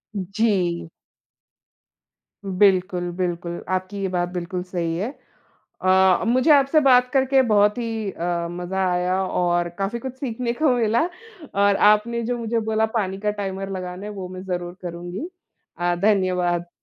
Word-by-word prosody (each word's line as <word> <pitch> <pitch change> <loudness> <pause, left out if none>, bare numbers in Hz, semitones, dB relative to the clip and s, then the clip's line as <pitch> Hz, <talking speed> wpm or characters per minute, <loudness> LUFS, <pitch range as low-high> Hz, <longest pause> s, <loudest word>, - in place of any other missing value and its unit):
जी। 190 -4 0 1.6
बिल्कुल, 185 -2 +2
बिल्कुल, 175 -1 -3
आपकी 185 +2 -2
ये 195 - 0
बात 175 -1 -1
बिल्कुल 180 0 -4
सही 175 -3 -3
है। 205 +7 -2 0.7
अ, 185 0 +4
मुझे 255 +6 +3
आपसे 280 +1 +5
बात 250 -1 +5
करके 270 -1 +3
बहुत 210 +1 +4
ही 225 -3 -3
अ, 170 -1 -2
मज़ा 180 +2 -2
आया 180 +1 0
और 175 -1 0
काफ़ी 200 +4 -2
कुछ 260 +1 -6
सीखने 240 -2 -2
को 295 +2 +2
मिला 230 +1 +2 0.5
और 200 0 +3 0.2
आपने 235 +3 0
जो 240 +1 -2
मुझे 230 0 -1
बोला 220 0 +1
पानी 190 -3 -1
का 210 +1 0
टाइमर 195 -1 -4
लगाना 180 +1 -6
है, 210 - -5
वो 195 -3 -6
मैं 185 0 -8
जरूर 175 -1 -4
करुँगी। 175 - -6 0.5
अ, 175 0 +1
धन्यवाद। 180 -4 +1
190 Hz, 145 wpm, -23 LUFS, 180-220 Hz, 1.6 s, आपसे